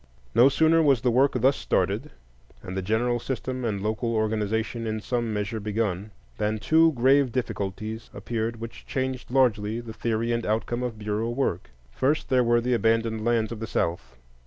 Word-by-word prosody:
No 120 +4 +7
sooner 160 +3 +4
was 140 -7 +3
the 125 - +2
work 135 +4 +3
thus 130 +3 +3
started, - - 0 0.5
and 90 - -6
the 95 - -1
general 115 +5 0
system 130 +1 -4
and 105 -4 -2
local 110 +2 -1
organization 110 +1 -1
in 110 0 -2
some 120 +1 -2
measure 105 +1 -2
begun, 105 -2 -2 0.3
than 105 +1 0
two 160 +8 +4
grave 135 +1 +3
difficulties 110 -2 -4
appeared 115 0 -3
which 115 0 -9
changed 130 -2 -3
largely 115 -4 +2
the 115 -2 -8
theory 115 +1 -1
and 115 0 0
outcome 115 +3 -1
of 120 -3 -3
Bureau 105 +2 -2
work. 120 -8 -2 0.2
First, 140 - 0
there 130 -2 +4
were 120 0 +3
the 125 +1 0
abandoned 115 -1 +1
lands 115 -1 +1
of 115 - -5
the 115 - -4
South. 85 - -2
115 Hz, 175 wpm, -26 LUFS, 110-125 Hz, 0.5 s, No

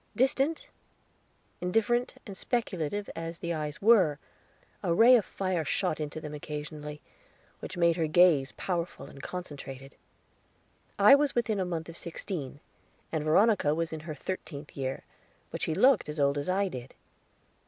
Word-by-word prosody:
Distant, 270 +5 +2 0.9
indifferent, 225 +7 +1
and 200 - -8
speculative 205 - -2
as 165 0 -5
the 170 0 -3
eyes 150 +1 -4
were, 190 -10 +5 0.6
a 180 - -1
ray 240 +6 +8
of 230 - +4
fire 185 -3 -2
shot 155 +1 -1
into 150 0 -4
them 150 -1 -7
occasionally, 150 0 -7 0.6
which - - -7
made 170 -1 +3
her 160 -2 +1
gaze 155 -4 +4
powerful 175 -2 -3
and 140 - -12
concentrated. 140 -6 -7 1.0
I - - +8
was 285 0 +4
within 225 -4 0
a 185 - 0
month 165 -2 -4
of 165 - -9
sixteen, 160 -5 -6 0.5
and 160 -2 -1
Veronica 160 -1 +3
was 165 0 -2
in 160 - -4
her 155 0 -7
thirteenth 150 -3 -6
year; 135 -1 -3 0.5
but - - -5
she 155 - 0
looked 260 - +4
as 150 0 -5
old 140 0 +2
as 145 - -4
I 195 +2 +2
did. 130 -7 -8
165 Hz, 155 wpm, -29 LUFS, 150-195 Hz, 1.0 s, ray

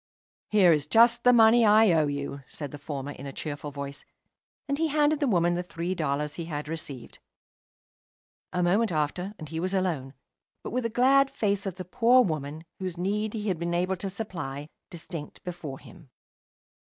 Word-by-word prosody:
"Here 190 -5 +6
is 150 -1 -1
just 235 +5 +5
the 250 - +7
money 230 0 +6
I 215 -1 +6
owe 155 -3 +3
you," 140 0 -4
said 145 -3 -7
the 145 - -8
former, 145 -2 -5
in 140 -1 -8
a - - -5
cheerful 145 +1 -5
voice, 140 0 -7 0.6
and 280 +1 -1
he 325 - +2
handed 300 0 +2
the 285 - +1
woman 175 -5 +2
the 175 - -1
three 175 0 -4
dollars 150 -3 -2
he 170 - -4
had 150 -2 -5
received. 150 -6 -7 1.3
A 180 0 0
moment 200 +5 +2
after 175 +6 -2
and 155 - -9
he 160 +1 -4
was 185 +3 -1
alone, 155 -8 -1 0.5
but - - -6
with 250 0 -1
the - - +1
glad 270 +4 +4
face 205 -6 -1
of 190 - -4
the 185 0 -7
poor 245 +6 +4
woman, 155 - -4
whose 185 -2 -4
need 210 +4 -1
he 215 -1 -3
had 185 -5 -1
been 170 0 -1
able 180 +2 0
to 195 +2 -4
supply, 160 -8 -6 0.2
distinct 165 -2 -8
before 160 -6 -6
him. 160 -3 -16
175 Hz, 190 wpm, -27 LUFS, 150-215 Hz, 1.3 s, the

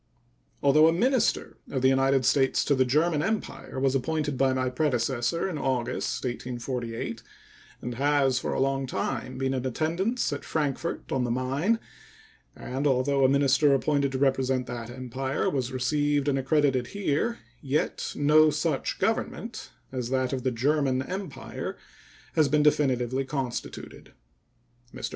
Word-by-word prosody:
Although 155 +3 +6
a - - +5
minister 250 +7 +1
of 130 -2 -2
the - - +6
United 135 0 +3
States 135 +1 +3
to 145 - +3
the 130 -1 +3
German 150 +4 +2
Empire 215 -8 -3
was 135 0 +2
appointed 150 +2 -1
by 135 +1 +2
my 130 0 0
predecessor 125 +2 0
in 170 -6 -4
August, 130 -3 -1
1848, 120 -2 -4 0.6
and 125 - -3
has 135 0 +2
for - - -3
a - - -1
long 135 0 0
time 130 0 -3
been 135 0 0
in 130 -2 -2
attendance 165 - -1
at 145 - -5
Frankfort 155 +1 -2
on 130 -2 +1
the 120 - -1
Main, 135 - 0 0.8
and 135 +4 -2
although 135 +1 +2
a 130 - +6
minister 140 +1 +4
appointed 140 0 +1
to - - 0
represent 130 -1 +1
that 120 -1 -6
Empire 130 +2 -3
was 130 -3 -2
received 145 +3 0
and 135 -1 +2
accredited 135 -2 +2
here, 205 +6 0 0.2
yet 140 +2 -1
no 155 +2 +5
such 150 -2 -1
government - - -2 0.2
as 125 -2 -3
that 130 0 0
of 130 - -2
the 130 - +1
German 130 +1 +1
Empire 185 0 -6 0.6
has 155 -3 +3
been 150 +2 +3
definitively 130 -3 +2
constituted. 135 -3 -5 0.8
Mr. - - -5
135 Hz, 150 wpm, -27 LUFS, 130-150 Hz, 0.8 s, Although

